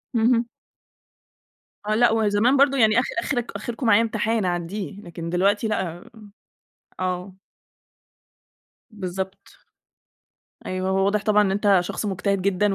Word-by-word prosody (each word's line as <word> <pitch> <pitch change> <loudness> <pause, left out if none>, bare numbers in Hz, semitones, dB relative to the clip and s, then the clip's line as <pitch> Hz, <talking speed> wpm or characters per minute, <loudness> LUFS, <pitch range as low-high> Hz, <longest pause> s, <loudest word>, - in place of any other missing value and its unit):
اهم. 235 +1 +3 1.4
آه 215 - +1
لأ، 240 +1 +4
وهو 220 -1 +1
زمان 230 +7 +3
برضه 275 0 +4
يعني 220 -1 +4
آخر 255 - -3
آخر 245 0 -1
آخركم 240 +2 -5
معايا 220 0 +6
امتحان 220 -1 0
أعدّيه، 185 +3 -4
لكن 170 -3 -7
دلوقتي 200 +5 +1
لأ، 175 -5 -3 1.0
آه. 185 +1 -3 1.6
بالضبط، 190 -2 -6 1.2
أيوه 185 0 -2
هو 190 0 +2
واضح 200 +1 +1
طبعًا 210 -1 +4
إن 200 - +1
أنت 200 0 +3
شخص 195 +4 -4
مجتهد 195 0 -1
جدًا 200 +1 +1
205 Hz, 125 wpm, -23 LUFS, 185-225 Hz, 1.6 s, معايا